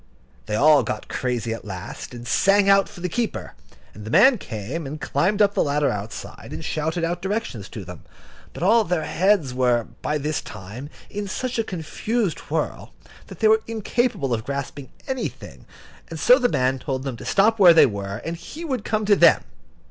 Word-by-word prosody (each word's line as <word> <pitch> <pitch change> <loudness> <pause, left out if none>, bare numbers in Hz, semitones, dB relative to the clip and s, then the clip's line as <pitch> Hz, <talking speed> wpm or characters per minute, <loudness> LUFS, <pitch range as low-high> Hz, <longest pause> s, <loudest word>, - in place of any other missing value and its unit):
They 105 - -1
all 150 +5 +6
got 110 -2 -5
crazy 120 -3 -2
at 115 - -7
last, 95 -2 -7
and 120 0 -9
sang 200 +8 +3
out 195 0 +5
for 200 -4 -12
the 180 - -1
keeper, 230 +6 -3 0.4
and 105 - -10
the 110 - -7
man 220 - +6
came 125 - -5
and 150 +3 -6
climbed 205 +7 +1
up 200 0 +2
the - - +1
ladder 145 0 +1
outside, 105 +2 -7
and - - -6
shouted 160 +2 -2
out 175 +1 -1
directions 195 - -3
to - - -8
them. - - -10 0.5
But - - -7
all 225 +4 +5
their 175 -4 -1
heads 175 -6 +2
were, 125 -2 +2 0.2
by 150 - -1
this 150 +1 -2
time, 105 +8 -9 0.2
in 205 0 -4
such 250 +5 -3
a - - +2
confused 190 +1 -2
whirl - - -3 0.3
that - - -12
they 220 - +5
were 220 0 +5
incapable 225 - -1
of 110 -1 -2
grasping 140 0 -5 0.2
anything, 260 -1 -5 0.4
and - - -6
so - - +6
the 245 - +2
man 130 - +1
told 130 -1 -3
them 135 -3 -4
to - - -10
stop 220 +3 +3
where 175 -4 +8
they - - +8
were, 100 -1 -4
and 165 - -3
he 305 - -8
would 260 -8 -2
come 215 -1 -1
to 205 0 +5
them. - - +5
160 Hz, 195 wpm, -23 LUFS, 125-205 Hz, 0.5 s, where